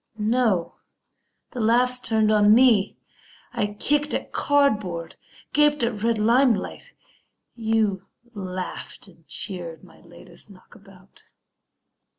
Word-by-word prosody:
No, 215 -5 0 0.7
the 250 - -7
laugh's 245 +3 +3
turned 220 -3 +1
on 210 0 +5
me! 230 -5 +3 0.6
I 205 - -1
kicked 290 +8 -1
at - - -5
cardboard, 210 - 0 0.4
gaped 295 -2 +3
at 230 -3 -2
red 230 0 +1
limelight; 230 -1 +1 0.6
You 220 -4 -1 0.3
laughed 185 -1 -7
and 165 -4 -21
cheered 170 0 -5
my 180 - -18
latest 170 +4 -16
knockabout. 195 0 -19
215 Hz, 105 wpm, -23 LUFS, 185-240 Hz, 0.7 s, on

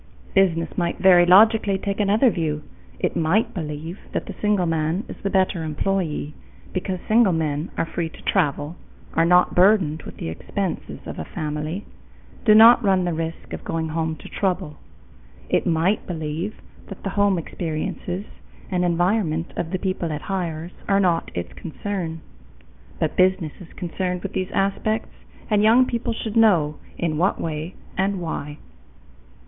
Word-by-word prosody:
Business 170 -4 +2
might 170 -1 -1
very 180 -2 +6
logically 205 +1 +6
take 200 +1 -3
another 210 +5 +4
view. 155 -4 -2 0.3
It - - -1
might 170 +7 +2
believe 160 +1 -5
that - - -2
the - - -7
single 210 -3 +2
man 165 +3 0
is - - -7
the 200 - -1
better 190 -3 +1
employee, 155 -1 -2 0.4
because 185 0 -2
single 220 -4 +5
men 155 0 -1
are - - +1
free 165 0 -3
to - - -15
travel, 155 -2 0 0.4
are 165 - +3
not 180 +1 +5
burdened 180 -5 +4
with - - -10
the - - -4
expenses 185 - -4
of - - -6
a - - -3
family, 155 +5 -4 0.6
do 215 -2 +7
not 230 +2 +8
run 190 -3 +3
the 175 - 0
risk 165 0 -5
of - - -6
going 160 -1 -2
home 160 0 -1
to 150 - -12
trouble. 180 -6 -2 0.7
It - - +1
might 170 +5 +1
believe 165 +4 -3 0.3
that 195 - -10
the 195 - -2
home 200 -1 +2
experiences 170 +3 -4 0.5
and 180 -1 +1
environment 175 -1 +1
of 165 - -3
the 185 - -1
people 185 -2 -2
it 150 -1 -4
hires 175 -3 -3 0.2
are 195 0 +3
not 175 -4 +1
its 85 0 -4
concern. 170 -1 -5 0.8
But 160 -2 0
business 185 -4 +2
is 180 - -12
concerned 180 +1 -3
with - - -5
these 185 0 -2
aspects 215 +3 0 0.4
and 210 -2 +3
young 230 +4 +6
people 235 -1 -2
should 220 -1 -5
know 175 -10 +4 0.2
in 160 -3 -1
what 185 +3 +2
way 160 +2 -4 0.2
and 195 0 0
why. 150 -3 -4
180 Hz, 160 wpm, -23 LUFS, 160-195 Hz, 0.8 s, not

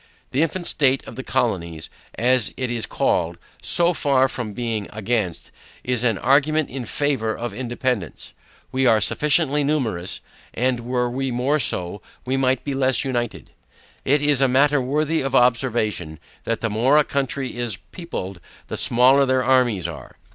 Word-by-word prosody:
The 135 - +1
infant 170 +2 -1
state 135 -4 +4
of - - -10
the 130 - -5
Colonies, 90 - -2 0.2
as 125 -1 +2
it 130 -2 -2
is 115 -2 -2
called, - - 0 0.2
so 175 +1 +2
far 135 -4 +2
from 120 -4 -5
being 115 -3 -3
against, 110 -4 -2 0.3
is 125 -2 -1
an 115 -5 +2
argument 150 +5 +2
in 130 -1 -5
favor 130 -4 -1
of 120 -3 -5
independance. 120 - -3 0.4
We 130 0 +1
are 110 -2 +5
sufficiently 150 - +2
numerous, 115 - -1 0.4
and 125 0 +1
were 125 +1 -1
we 130 +2 -2
more 130 +5 0
so, 95 -6 -1 0.2
we 130 +1 -1
might 130 -1 +1
be 140 - -3
less 130 -1 +1
united. 120 -3 -3 0.5
It 145 +2 +2
is 145 -2 +2
a 135 - +5
matter 140 +2 +3
worthy 150 +5 0
of 135 -1 -2
observation, 115 -9 +1 0.3
that 115 -1 -2
the 115 - -1
more 125 +7 +3
a 150 - +5
country 135 -2 -2
is 120 -5 -2
peopled, 100 - -6 0.3
the - - -4
smaller 130 +3 +4
their 130 0 +2
armies 120 -8 +2
are. 80 -4 -10
125 Hz, 160 wpm, -22 LUFS, 115-135 Hz, 0.5 s, are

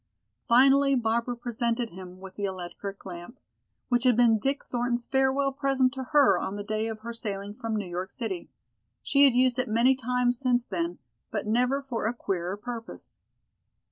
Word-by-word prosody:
Finally 275 +3 +5
Barbara 235 0 0
presented 235 0 -2
him 185 0 -10
with 190 0 -10
the 205 - -3
electric 190 +1 -6
lamp, 180 +6 -9 0.5
which 245 -1 +1
had 250 -3 +4
been 230 -3 +5
Dick 275 +5 -1
Thornton's 240 -1 -1
farewell 270 +1 +2
present 270 -2 +1
to 265 -2 -5
her 260 - +4
on 190 - -3
the 205 - -5
day 215 +1 -2
of 220 -1 -6
her 235 +1 -6
sailing 205 -3 -4
from 225 +1 -4
New 210 -2 -2
York 180 +1 -4
City. 205 -8 -5 0.5
She 280 +1 +5
had 265 -3 +4
used 255 0 +3
it 255 -2 -1
many 235 +4 +4
times 250 -1 0
since 245 -2 +1
then, 340 +5 -3 0.3
but - - -3
never 250 +6 +1
for 240 -5 -2
a 235 - -2
queerer 190 -3 -3
purpose. 225 - -8
235 Hz, 175 wpm, -27 LUFS, 205-255 Hz, 0.5 s, Finally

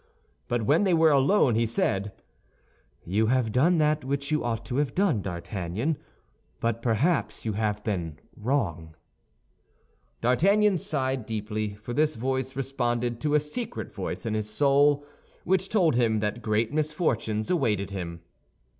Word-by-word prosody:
But 120 -2 0
when 150 - +3
they 185 -4 +3
were 160 -1 +5
alone 140 - +4
he 115 +1 +2
said, 100 -3 0 0.9
"You 105 +5 +1
have 125 -2 +1
done 160 +10 +3
that 150 -1 +2
which 140 +2 -2
you 150 - +1
ought 115 -1 -2
to 125 - -3
have 145 -4 0
done, 180 - +2
D'Artagnan; 95 - -3 0.6
but 115 0 -1
perhaps 115 -1 0
you 110 - -1
have 105 0 -1
been 85 -7 -3 0.2
wrong." 90 - -2 1.3
D'Artagnan 195 - +3
sighed 130 -6 -2
deeply, 105 -1 -3
for 110 +4 -7
this 155 +3 +2
voice 130 +2 -2
responded 120 -3 -1
to 150 -1 +1
a - - +6
secret 225 +11 -5
voice - - -5
of 110 - -1
his 105 -1 -2
soul, 145 +3 +3 0.4
which 190 +1 +1
told 180 -8 +3
him 115 -3 +2
that 105 +3 -2
great 110 +3 0
misfortunes 145 -8 -1
awaited 105 - 0
him. 85 -3 -5
120 Hz, 145 wpm, -27 LUFS, 110-150 Hz, 1.3 s, a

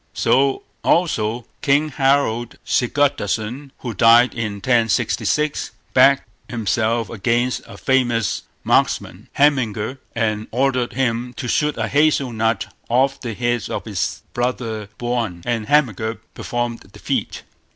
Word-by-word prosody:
So, 135 0 +2 0.2
also, 120 -9 +1 0.2
King 145 +2 +2
Harold 135 -5 +1
Sigurdarson, 130 -1 0
who 120 -3 -4
died 115 +4 +6
1066, 115 +6 0 0.2
backed 135 +1 +5 0.2
himself 115 0 0
against 120 +3 0
a 100 - -11
famous 120 -3 +1 0.2
marksman, - - 0
Hemingr, 130 -4 +1 0.2
and 110 -2 -1
ordered 130 0 0
him 125 -1 -1
to 130 - -5
shoot 150 +4 +1
a - - -1
hazel 145 -4 +2
nut 110 -1 0 0.2
off 135 +3 +2
the 115 -4 -4
head 120 -1 -1
of - - -4
his - - -3
brother 120 -4 -2
Björn, 115 -8 -2
and 115 -3 -1
Hemingr 115 -7 +1 0.2
performed 120 -1 -3
the - - -17
feat. - - -3
120 Hz, 120 wpm, -20 LUFS, 115-135 Hz, 0.2 s, died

